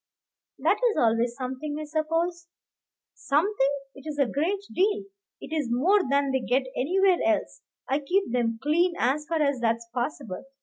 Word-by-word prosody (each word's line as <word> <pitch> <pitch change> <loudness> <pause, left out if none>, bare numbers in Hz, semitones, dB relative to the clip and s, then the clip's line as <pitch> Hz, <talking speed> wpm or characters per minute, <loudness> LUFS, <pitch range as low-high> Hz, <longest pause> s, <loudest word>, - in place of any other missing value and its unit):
"That - - +2
is 430 - -3
always 235 -2 +2
something, 265 +4 -4
I - - -4
suppose." 330 +3 -1 0.7
"Something! 300 0 +1 0.2
it 275 +2 -12
is 300 -1 -4
a 280 - +4
great 340 +11 -1
deal; 405 +2 +2 0.4
it - - -8
is 295 -6 -1
more 340 +13 +4
than 280 0 +2
they 265 - +1
get 255 +1 +1
anywhere 370 +6 +3
else. 330 -1 0 0.3
I 275 - +1
keep 360 +3 0
them 230 -2 0
clean, 340 +4 +2
as 290 +5 0
far 325 -2 +1
as 280 -3 +1
that's 230 0 0
possible. 240 -5 -4
295 Hz, 165 wpm, -26 LUFS, 255-340 Hz, 0.7 s, a